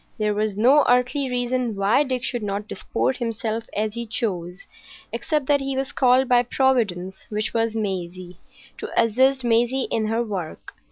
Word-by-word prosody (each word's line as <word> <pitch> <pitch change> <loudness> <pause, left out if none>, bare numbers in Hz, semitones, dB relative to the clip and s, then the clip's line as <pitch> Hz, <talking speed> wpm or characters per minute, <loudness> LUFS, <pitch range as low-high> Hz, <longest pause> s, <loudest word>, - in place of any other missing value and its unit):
There 210 -2 0
was 210 -1 -1
no 265 +7 +5
earthly 250 +3 +2
reason 245 -2 -1
why 200 +7 +3
Dick 260 -4 -1
should 245 -2 -2
not 205 0 -3
disport 235 +6 -2
himself 230 -1 -3
as 215 0 -1
he 235 0 -5
chose, 185 -5 -3 0.5
except 300 -3 -1
that 285 +1 +3
he 270 -1 -3
was 270 0 -2
called 255 0 +3
by 245 -1 +5
Providence, 225 -8 0
which 215 0 -2
was 225 -1 0
Maisie, 185 -4 -4 0.4
to - - -5
assist 260 +4 +3
Maisie 240 +3 +1
in 220 -1 0
her 225 +2 0
work. 190 -8 -6
230 Hz, 165 wpm, -23 LUFS, 210-255 Hz, 0.5 s, no